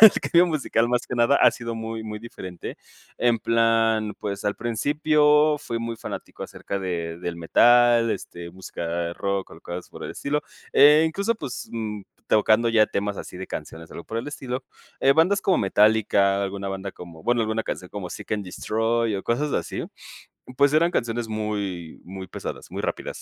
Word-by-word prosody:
el 220 -3 +12
cambio 175 0 +4
musical 135 -7 0
más 125 0 +1
que 125 - -5
nada 120 +4 +4
ha - - +6
sido 115 -1 -5
muy 115 0 -5
muy 105 -1 -6
diferente. 95 -6 -8 0.4
En 120 -2 +2
plan, 115 -2 +2
pues 100 -1 -4
al 105 - +1
principio 150 +5 +3
fui 115 -5 -4
muy 115 0 -4
fanático - - -7
acerca 100 - -5
de 85 -3 -3
del 85 -1 -4
metal, 120 +7 +5
este, 85 -1 -7
música 85 -2 -4
rock 100 0 -2
o 80 - -13
cosas 85 +1 -7
por - - -9
el - - -5
estilo 150 +1 -2 0.3
e 150 +2 +7
incluso, 200 +8 0
pues 140 - -6
mm, 105 -3 -4 0.3
tocando 110 +2 +4
ya 110 -2 +4
temas 100 0 -2
así - - -8
de 95 +1 -7
canciones, 80 0 -7
o - - -11
algo 85 - -8
por 115 - -6
el 115 - -3
estilo, 130 -3 -5 0.4
eh, 135 - +5
bandas 180 +7 +3
como 190 - +3
Metallica, 100 -1 +3
alguna 100 0 -4
banda 95 0 -5
como 85 -2 -12
bueno, 120 0 +2
alguna 110 0 -1
canción 90 - -5
como 100 -3 -5
Seek - - -9
and 105 -2 -1
Destroy 115 +3 0
o 95 - -5
cosas 140 +5 0
así, - - -2 0.8
pues 140 0 +5
eran 170 +2 +4
canciones 115 -1 -1
muy, 100 -6 -4
muy 95 +1 -7
pesadas, - - -7
muy - - -4
rápidas, - - -4
110 Hz, 185 wpm, -24 LUFS, 100-120 Hz, 0.8 s, el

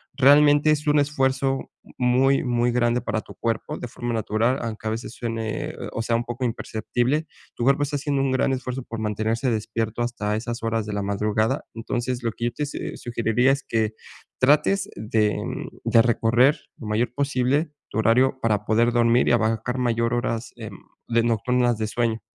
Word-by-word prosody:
realmente 145 +2 +6
es 150 0 0
un 150 0 +4
esfuerzo 135 -1 0 0.3
muy, 130 +2 +3
muy 120 -1 +1
grande 120 0 +1
para 110 -2 -2
tu - - -13
cuerpo 115 -1 -2
de 125 - -5
forma 120 +1 -4
natural, 115 +4 0
aunque 110 -1 -5
a - - 0
veces 115 +1 -5
suene, 115 -2 -3 0.2
o - - -2
sea, 115 0 0
un 115 - 0
poco 120 +2 -3
imperceptible. 120 +5 -1 0.3
Tu - - -3
cuerpo 140 +3 +3
está 145 +1 -2
haciendo 140 -1 -1
un 135 -1 +1
gran 130 +1 +1
esfuerzo 130 0 -4
por 115 -2 -7
mantenerse 110 +4 -1
despierto 110 +1 -2
hasta 105 -3 -2
esas 115 +1 -4
horas 115 -1 -1
de 105 - -5
la 100 - -1
madrugada. 105 +2 0
Entonces, 120 +2 -3
lo 115 - 0
que 115 - -4
yo 120 - 0
te 150 +5 -2
se - - -5
sugeriría 120 +2 +1
es 135 -1 -1
que 110 -3 -1 0.5
trates 150 +9 +3
de 110 -1 0 0.5
de 115 - +5
recorrer 120 +4 +3 0.2
lo - - -9
mayor 115 +2 0
posible 140 +2 +1 0.2
tu - - -5
horario 125 +4 +3
para 105 -2 +1
poder 115 +3 +3
dormir 120 0 +3
y - - +3
abarcar 115 +2 0
mayor 115 -1 +1
horas, 115 -1 -2
em, - - -8 0.3
de 115 -1 +2
nocturnas 120 +1 +1
de 110 - -1
sueño. 115 0 -1
120 Hz, 185 wpm, -24 LUFS, 115-130 Hz, 0.5 s, realmente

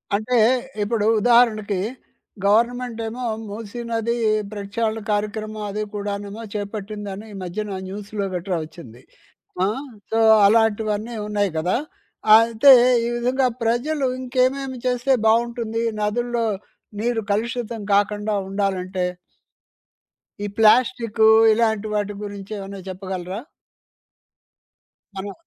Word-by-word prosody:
అంటే 225 +4 0 0.5
ఇప్పుడు 210 0 0 0.2
ఉదాహరణకి, 215 -4 +3 0.7
గవర్నమెంటేమో 235 +2 0 0.3
మూసీనది 230 +2 -3 0.4
ప్రెక్షాళన 215 +2 -2
కార్యక్రమం 215 +1 -2
అది 210 +2 -3
కూడానేమో 205 +1 -5
చేపట్టిందని 205 0 -5
ఈ - - -8
మధ్యన 195 +2 -4
న్యూస్‌లో 200 +1 -5
గట్ర 180 +1 -3
ఒచ్చింది. 135 -7 -13 0.6
ఆ? - - +2 0.4
సో, 225 - +2 0.3
అలాంటివన్నీ 220 +1 +1
ఉన్నాయి 205 -3 0
గదా! 175 +7 +1 0.6
అయితే 230 +4 +6 0.3
ఈ - - 0
విధంగా 255 +2 +1 0.2
ప్రజలు 265 +5 0
ఇంకేమేమి 260 +1 0
చేస్తే 250 +2 +2
బావుంటుంది 230 0 +1 0.2
నదుల్లో 235 +2 0 0.6
నీరు 235 -1 0
కలుషితం 230 +1 -2
కాకుండా 210 +1 +1 0.2
ఉండాలంటే? 190 -2 -1 1.4
ఈ - - -1
ప్లాస్టికు, 225 0 +4 0.3
ఇలాంటి 220 -2 +1
వాటి 205 0 -1
గురించి 200 0 -8
ఏమన్నా 195 0 -7
చెప్పగలరా? 185 +1 -5 1.8
అను 200 +1 -5
215 Hz, 95 wpm, -22 LUFS, 200-235 Hz, 1.8 s, అయితే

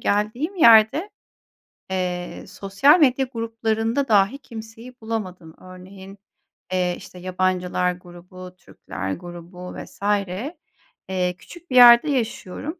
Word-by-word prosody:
geldiğim 235 - -1
yerde, 230 - +5 0.8
eee, 180 -1 -4
sosyal 235 - +3
medya 270 -3 +3
gruplarında 225 +2 -2
dahi 205 +3 +3
kimseyi 230 -1 -11
bulamadım. 185 -7 -6
Örneğin, 190 +2 -13 0.6
eee, 180 -1 0
işte, 180 - -13
yabancılar 180 0 -1
grubu, 180 +1 -13
Türkler 95 - -7
grubu 175 +1 -10
vs. - - -18 1.1
eee, 180 -1 -1
küçük 345 - -15
bir - - -2
yerde 240 +3 +8
yaşıyorum. 265 - -4
200 Hz, 105 wpm, -22 LUFS, 180-235 Hz, 1.1 s, yerde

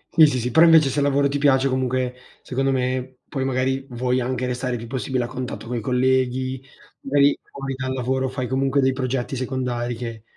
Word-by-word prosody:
Sì, 160 -2 +8
sì, 135 -3 0
si 125 +1 -2
però 160 +7 +6
invece 160 -4 +6
se 145 - -1
il 140 - +2
lavoro 140 0 +3
ti 140 +1 -2
piace, 135 -2 +4
comunque 130 -1 -1 0.3
secondo 135 +1 -1
me, 130 0 -2
poi 135 -2 -3
magari 130 +1 0
vuoi 125 +1 0
anche 125 0 -2
restare 125 0 -2
più 115 - -8
possibile 130 +1 -2
a - - -3
contatto 125 +1 -6
coi 120 0 -3
colleghi, 130 +1 0 0.4
magari 140 +1 +3
fuori 135 -1 -6
dal 130 0 -3
lavoro 130 +1 -1
fai 130 -1 -3
comunque 135 +2 +1
dei 130 -1 +3
progetti 130 0 -2
secondari 125 -2 -2
che 115 -2 -7
130 Hz, 195 wpm, -22 LUFS, 125-135 Hz, 0.4 s, Sì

